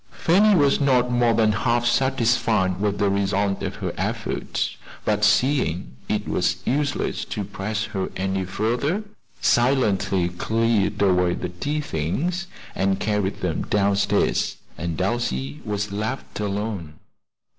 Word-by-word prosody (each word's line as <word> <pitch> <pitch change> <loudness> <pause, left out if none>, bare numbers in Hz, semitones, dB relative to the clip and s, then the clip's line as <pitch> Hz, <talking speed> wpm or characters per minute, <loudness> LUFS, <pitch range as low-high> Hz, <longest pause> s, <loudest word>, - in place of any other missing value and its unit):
Fanny 200 +5 +4
was 145 -3 +3
not 125 -3 +3
more 120 -2 +3
than 110 -1 +4
half 120 +2 +1
satisfied 115 -7 +2
with 100 -1 0
the 100 - +2
result 100 0 0
of - - -3
her - - -4
efforts; - - -2 0.3
but 105 -1 +1
seeing 105 - +2
it - - -1
was - - +1
useless 145 +2 0
to - - -4
press 105 +2 -3
her 100 -3 -3
any 95 0 -1
further, 120 - -1 0.4
silently 110 -8 +2
cleared 105 +2 0
away 90 -2 +3
the 90 - -4
tea 145 - -2
things 150 - -2 0.3
and 95 0 0
carried 105 -2 -1
them - - -1
down 100 -1 +2
stairs, 100 0 +1 0.2
and 85 -1 -4
Elsie 75 - -1
was 105 -1 -3
left 110 +6 -4
alone. 100 -6 -3
105 Hz, 135 wpm, -23 LUFS, 95-120 Hz, 0.4 s, Fanny